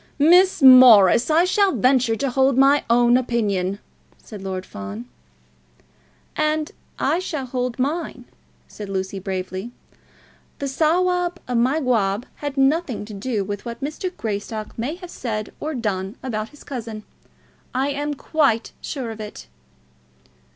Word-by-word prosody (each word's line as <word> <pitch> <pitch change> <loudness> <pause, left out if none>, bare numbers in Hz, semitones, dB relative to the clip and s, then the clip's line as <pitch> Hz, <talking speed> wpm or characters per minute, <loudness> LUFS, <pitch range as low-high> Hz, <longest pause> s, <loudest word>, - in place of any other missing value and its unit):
"Miss 350 +2 +5
Morris, 245 - +8
I 325 +3 +4
shall 390 +1 +2
venture 250 -1 +2
to 265 +4 -2
hold 265 0 +2
my 275 +2 +5
own 240 +1 +5
opinion," 205 -6 -1 0.4
said 210 -3 -11
Lord 190 -1 -5
Fawn. 100 +4 -8 1.3
"And 305 0 0 0.3
I 340 - +1
shall 310 -7 -4
hold 250 -1 -3
mine," 275 -2 -3 0.4
said 205 -2 -9
Lucy 190 0 -3
bravely. 190 +2 -5 0.9
"The 280 - -4
Sawab 355 +5 +1
of 250 - -2
Mygawb 245 -5 +1
had 290 -1 -5
nothing 270 -4 +1
to 215 - -10
do 210 +1 -2
with 205 +1 -5
what 235 +2 -7
Mr. 305 +6 -3
Greystock 215 0 -5
may 250 +8 -3
have 360 -1 -11
said 215 -4 -5
or 310 0 -4
done 200 -3 -3
about 220 -4 -3
his 295 - -16
cousin. 225 -5 -7 0.7
I 265 +2 +1
am 290 +1 -3
quite 275 -6 0
sure 255 -6 -5
of 220 - -9
it." 210 - -9
250 Hz, 135 wpm, -22 LUFS, 210-290 Hz, 1.3 s, Morris